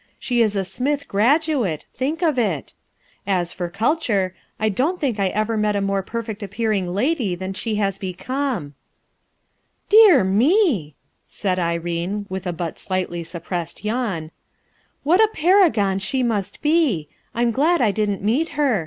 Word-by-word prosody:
She 245 -2 0
is 215 -2 +2
a 195 -1 0
Smith 280 +9 -2
graduate, 245 - +1
think 305 +7 -2
of 305 -6 +2
it 185 - -1 0.5
I 200 - +2
As 175 -2 -1
for 175 -1 -4
culture, 200 - 0 0.3
I 220 - +1
don't 280 - 0
think 255 -8 -1
I 195 - +2
ever 215 +3 -1
met 210 -1 +1
a - - +1
more 195 0 0
perfeet 225 +1 -5
appearing 205 -1 -1
lady 210 - 0
than 190 +2 -5
she 220 +3 -2
has 195 -2 -1
become/ 240 - -2
1 145 0 -12 1.2
"Dear 410 - +8
me 240 - +3
I" 150 - -21 0.3
said 185 -3 -2
Irene 170 +4 -2
with 190 0 -4
a - - 0
but 170 -1 -5
slightly 185 -2 -2
suppressed 170 +2 -5
yawn, 210 -9 -2 0.7
"what 345 +8 +4
a 435 - +3
paragon 305 - +3
she 260 +6 -1
must 215 -2 -2
be; 295 - +2 0.3
I'm 235 0 +2
glad 310 +9 +2
I 225 -5 +3
didn't 205 -2 -1
meet 260 +11 +1
her. 275 -8 +2
210 Hz, 160 wpm, -21 LUFS, 185-265 Hz, 1.2 s, Dear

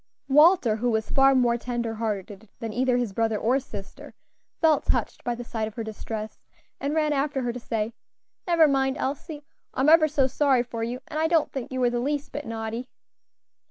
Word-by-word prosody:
Walter, 295 - +5
who 245 +2 0
was 220 -1 -1
far 270 0 +5
more 240 -2 +3
tender 240 -1 -3
hearted 210 -2 -4
than 225 -2 -5
either 250 +1 +2
his 240 -5 -2
brother 225 0 0
or 245 +6 +2
sister, 200 -7 -10 0.4
felt 315 -2 +3
touched - - -1
by 240 - -1
the 245 - -7
sight 225 -2 -3
of 215 - -10
her 230 - -3
distress, 220 0 -6 0.4
and 285 +2 -2
ran 305 -1 +2
after 275 -1 -1
her 240 -1 -1
to 250 - -6
say, 225 -1 -3 0.5
"Never 335 -3 +5
mind, 270 -1 +1
Elsie; 290 +2 -4 0.3
I - - 0
am 280 - +4
ever 320 -1 +7
so 290 -3 +2
sorry 265 -1 +2
for 235 -2 -6
you, 240 +3 -3
and 305 - -4
I 320 - +2
don't 325 -2 +2
think 270 0 -5
you 260 - -3
were 245 -1 +2
the 240 - -1
least 285 +3 -2
bit 290 0 -6
naughty." 225 +2 -4
250 Hz, 205 wpm, -25 LUFS, 225-280 Hz, 0.5 s, ever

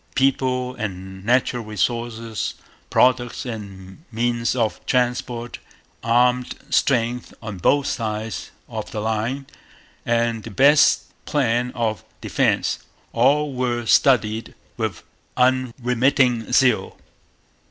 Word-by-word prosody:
People 130 -1 +1
and 95 -2 -6
natural 120 +1 +1
resources, 115 +2 -2 0.3
products 125 -1 +2
and 100 0 -8
means 120 +1 0
of 115 -4 -1
transport, 125 -1 -1 0.4
armed 125 +2 +2 0.2
strength 120 -2 +1
on 105 -4 -7
both 140 +9 +3
sides 110 -3 -3 0.2
of - - -6
the 110 - -4
line 110 +5 -2 0.6
and 115 -1 0
the 115 - -8
best 140 +7 +5 0.2
plan 125 -4 +1
of 115 -3 -1 0.2
defence, - - 0 0.3
all 140 +4 +3
were 120 -2 -1
studied 110 -3 +3 0.2
with - - -3 0.3
unremitting 125 -1 +2
zeal. 130 -4 +3
120 Hz, 100 wpm, -22 LUFS, 110-125 Hz, 0.6 s, best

